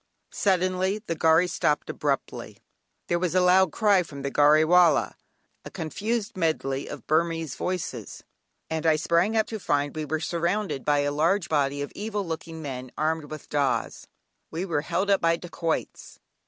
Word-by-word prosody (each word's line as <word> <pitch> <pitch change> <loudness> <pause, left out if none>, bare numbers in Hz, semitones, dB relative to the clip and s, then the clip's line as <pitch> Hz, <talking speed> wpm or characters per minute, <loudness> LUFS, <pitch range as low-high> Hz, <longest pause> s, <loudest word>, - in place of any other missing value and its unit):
Suddenly 185 +1 +1
the - - -2
gharry 160 +2 +4
stopped 165 -4 0
abruptly; 140 -2 -3 0.5
there 175 - +1
was 180 0 -1
a - - +5
loud 180 -1 +4
cry 205 -4 +3
from 140 -5 -8
the 140 - -2
gharry 150 +2 +5
wallah, 175 -2 +4 0.5
a - - -8
confused 210 +8 -3
medley 155 -6 -1
of - - -8
Burmese 165 -1 0
voices, 160 - -4 0.4
and 160 0 -2
I 160 - +5
sprang 170 +7 +1
up 220 - +3
to 220 - -6
find 145 -5 -1
we 155 -1 -3
were 155 +2 -2
surrounded 170 -1 -1
by 145 -1 +2
a 145 0 0
large 170 +6 +1
body 145 -2 0
of 145 - -7
evil 210 -1 -3
looking 160 -1 -6
men, 130 -3 -6
armed 155 0 0
with 155 -1 -8
"dahs." 140 -3 -1 0.4
We 170 +4 -3
were 165 -6 -1
"held 195 +6 -1
up" 195 - +3
by 165 0 +3
dacoits! 170 -1 -4
165 Hz, 165 wpm, -26 LUFS, 150-185 Hz, 0.5 s, a